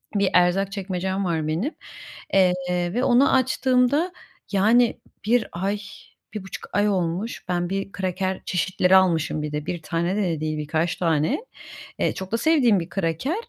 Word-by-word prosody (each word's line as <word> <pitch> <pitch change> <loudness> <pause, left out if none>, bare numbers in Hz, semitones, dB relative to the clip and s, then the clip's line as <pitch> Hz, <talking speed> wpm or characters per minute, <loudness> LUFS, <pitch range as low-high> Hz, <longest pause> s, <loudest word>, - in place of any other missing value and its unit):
bir 200 -2 +2
erzak 185 +2 +3
çekmecem 190 0 -3
var 160 -3 -1
benim, 180 - -2 0.6
eee, 185 -2 +5 0.4
ve 245 +3 0
onu 260 +2 +4
açtığımda 260 +5 +2 0.4
yani 225 +4 +3 0.3
1 230 +1 +2
ay, 195 +4 -2 0.5
1,5 195 -3 -7
ay 205 +1 +3
olmuş 185 +3 -2
ben 175 0 -1
bir 195 0 -3
kraker 190 0 -2
çeşitleri 185 +1 +2
almışım. 165 -5 +2
Bir 150 0 -4
de 150 0 -4
1 175 -2 -4
tane 170 +4 -1
de 210 - 0
de 165 -4 -1
değil, 155 0 -2
birkaç 160 +3 -1
tane. 165 - +1 0.6
Eee, - - +1
çok 190 0 -7
da 230 - +1
sevdiğim 245 - +3
bir 170 0 -6
kraker, 195 - -1
190 Hz, 155 wpm, -23 LUFS, 170-215 Hz, 0.6 s, eee